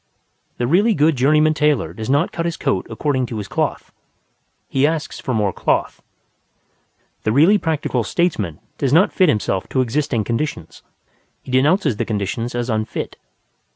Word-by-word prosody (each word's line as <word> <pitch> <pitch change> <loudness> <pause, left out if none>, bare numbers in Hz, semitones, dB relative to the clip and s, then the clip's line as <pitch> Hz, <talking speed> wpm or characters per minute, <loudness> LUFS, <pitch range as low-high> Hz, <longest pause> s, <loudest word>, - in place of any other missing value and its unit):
The 120 - -1
really 200 - +3
good 155 0 +3
journeyman 150 +4 +3
tailor 150 - +1
does 110 +5 -6
not 145 +5 +2
cut 165 0 -2
his 170 - -3
coat 95 - -1
according 130 +2 -1
to 115 - -5
his 105 -2 -5
cloth; - - -2 0.8
he 135 +2 +2
asks 160 -1 -3
for 135 - -4
more 105 -5 0
cloth. - - -1 1.2
The 110 - 0
really 165 - +5
practical 150 -8 -1
statesman 105 - -1 0.2
does 135 -3 0
not 180 +6 +4
fit 185 -4 +4
himself 105 -6 -1
to 130 - +1
existing 125 -2 0
conditions, 115 - -4 0.6
he - - -9
denounces 135 - +2
the - - -1
conditions 110 +3 -3
as 120 0 -2
unfit. 110 -2 -3
130 Hz, 155 wpm, -20 LUFS, 110-155 Hz, 1.2 s, really